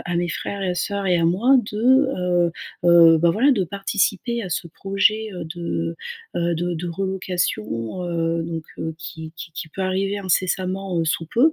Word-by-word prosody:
à 175 - -3
mes 175 0 0
frères 200 +5 -4
et 180 -1 0
sœurs 200 +2 -2
et 180 -2 +3
à 165 - +1
moi, 210 +11 +4
de, 210 - -5
heu 185 - +3 0.3
heu, 170 -1 +7
bah, 170 +1 +4
voilà, 250 +10 +4
de 210 -7 +1
participer 200 +5 -1
à 190 - -5
ce 175 - -2
projet, 200 +5 0
heu, 180 - -6
de, 165 0 -3 0.4
heu - - 0
heu, 170 0 +1
de 175 +1 -1
de 170 +2 -4
relocation, 175 - -2
heu, 165 -1 -1
donc 165 -1 -5
heu, 160 0 -3
qui 160 -1 -7
qui 160 +1 -8
qui 160 - -6
peut 190 +5 -5
arriver 195 +2 0
incessamment, 185 0 0
heu, 165 - +1
sous 165 +1 -1
peu. 265 - +3
180 Hz, 195 wpm, -22 LUFS, 165-195 Hz, 0.4 s, heu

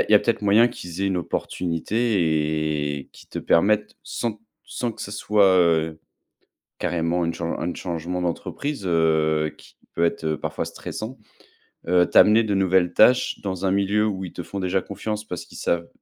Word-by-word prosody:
a - - +3
il - - +1
y - - +9
a - - +9
peut-être 115 +1 0
moyen 105 +4 +5
qu'ils 90 -1 -7
aient - - +2
une 95 -2 0
opportunité 85 +3 -3 1.0
et 70 - -12
qu'ils - - -16
te - - -6
permettent 105 +5 +2
sans 110 -3 -4 0.2
sans 120 -2 -3
que - - -8
ça 100 - -6
soit, 105 0 +2
heu, 80 -2 +2 0.8
carrément 85 +1 0
une 85 - -1
chan 85 0 -3
une 85 +1 -2
changement 90 0 -4
d'entreprise, 100 - -3
heu, 80 -2 +2
qui - - -18 0.2
peut 85 - +2
être, 85 - -2
heu, 80 -1 0
parfois - - -3
stressant, 115 +5 -7 0.7
heu, 90 0 +4
t'amener 110 +2 +6
de 105 -2 -1
nouvelles 95 -2 +3
tâches 125 +3 +4
dans 95 -1 -3
un - - +2
milieu 100 +2 +2
où 95 -2 -3
ils 90 - -9
te 85 - -5
font 100 - -6
déjà 95 0 0
confiance 105 +2 -5
parce 90 -5 -6
qu'ils - - -13
savent 85 0 -1
95 Hz, 185 wpm, -23 LUFS, 85-105 Hz, 1.0 s, y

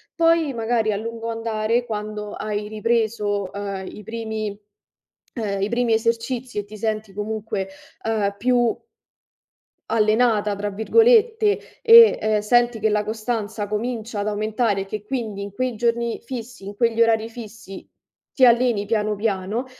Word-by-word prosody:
poi 330 -3 +3
magari 225 -1 0
a - - -1
lungo 230 +1 -5
andare, 225 +1 -1
quando 210 -1 -5
hai 210 0 -3
ripreso, 215 -2 -1
ehm, 200 -2 -5
i 210 - -11
primi 220 -2 -4 0.8
ehm, 200 -3 -2
i 200 - +1
primi 235 0 0
esercizi 235 +2 -1
e - - -3
ti 215 +1 -11
senti 215 -1 -2
comunque, 210 -1 -3 0.4
ehm, 210 -3 0
più 245 -1 +2 1.2
"allenata", 215 -1 +2
tra 205 +1 -3
virgolette, 440 - +3 0.2
e, 460 -1 +8
ehm, 215 0 +2
senti 240 +1 +2
che 220 - +2
la 210 0 +1
costanza 220 -1 -3
comincia 220 0 -3
ad 205 - -2
aumentare 215 0 0
e - - -5
che 210 +1 -6
quindi 215 -4 -4
in 200 0 -6
quei 255 +2 -2
giorni 235 +1 0
fissi, 240 -3 -8
in 200 +1 -7
quegli 230 +1 +1
orari 225 -1 +3
fissi, 220 -4 -10 0.5
ti 260 - +5
alleni 235 -3 +3
piano 215 -1 0
piano, 205 +3 -2
220 Hz, 145 wpm, -22 LUFS, 210-235 Hz, 1.2 s, e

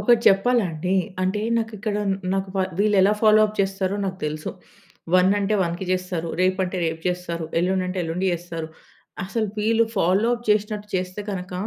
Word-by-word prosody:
ఒకటి 240 -2 +4
చెప్పాలండి. 195 -5 +2 0.3
అంటే 190 +3 0 0.2
నాకిక్కడ 220 -2 -3 0.4
నాకు 195 0 -2 0.3
వీళ్ళెలా 205 -1 +4
ఫాలో 215 0 +6
అప్ 215 0 -9
చేస్తారో 195 0 -1
నాకు 190 -1 -3
తెలుసు. 155 +1 -4 0.6
1 185 +1 +5
అంటే 205 +1 0
1 170 +2 -3
చేస్తారు. 180 -2 -2
రేపు 185 +1 +2
అంటే 185 +1 -4
రేపు 160 0 -3
చేస్తారు 175 -2 -3
ఎల్లుండి 185 +2 +1
అంటే 180 +1 -3
ఎల్లుండి 170 +3 -2
చేస్తారు. 165 -2 -5 0.6
అసలు 215 +3 -2
వీళ్ళు 225 +2 +3
ఫాలో 190 +6 +3
అప్ 240 0 -10
చేసినట్టు 210 0 +1
చేస్తే 185 +2 -2
గనక 180 -1 -5
190 Hz, 155 wpm, -23 LUFS, 180-210 Hz, 0.6 s, ఫాలో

